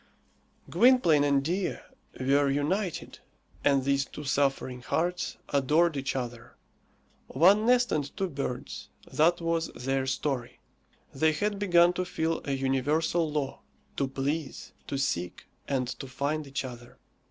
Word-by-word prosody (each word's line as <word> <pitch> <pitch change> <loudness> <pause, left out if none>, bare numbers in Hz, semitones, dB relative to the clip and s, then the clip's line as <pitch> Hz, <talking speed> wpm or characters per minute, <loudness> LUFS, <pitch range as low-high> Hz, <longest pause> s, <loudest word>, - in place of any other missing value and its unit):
Gwynplaine 235 - +5
and 140 -1 +2
Dea 180 +5 -1 0.4
were 140 +2 +3
united, 165 +7 -2 0.4
and 140 -2 +3
these 140 0 +2
two 150 - -9
suffering 135 -2 0
hearts 175 +8 -1
adored 150 +4 +3
each 135 -1 -2
other. 120 -3 -5 0.7
One 195 - +4
nest 245 0 +4
and 145 +2 -2
two 195 -2 0
birds 135 -3 -5 0.2
that 170 +3 +3
was 165 0 0
their 135 +1 -1
story. 130 -2 -2 0.5
They 155 +3 +2
had 205 +5 -1
begun 175 -3 +5
to 185 +1 -2
feel 165 -2 -1
a 140 - -1
universal 145 +5 +1
law 145 -3 -3 0.4
to 140 - +1
please, 140 +2 -4
to 140 - -2
seek, 90 -10 -2 0.2
and 130 -3 0
to 135 - -6
find 140 +3 -2
each 135 0 -3
other. 120 0 -10
145 Hz, 135 wpm, -28 LUFS, 135-170 Hz, 0.7 s, Gwynplaine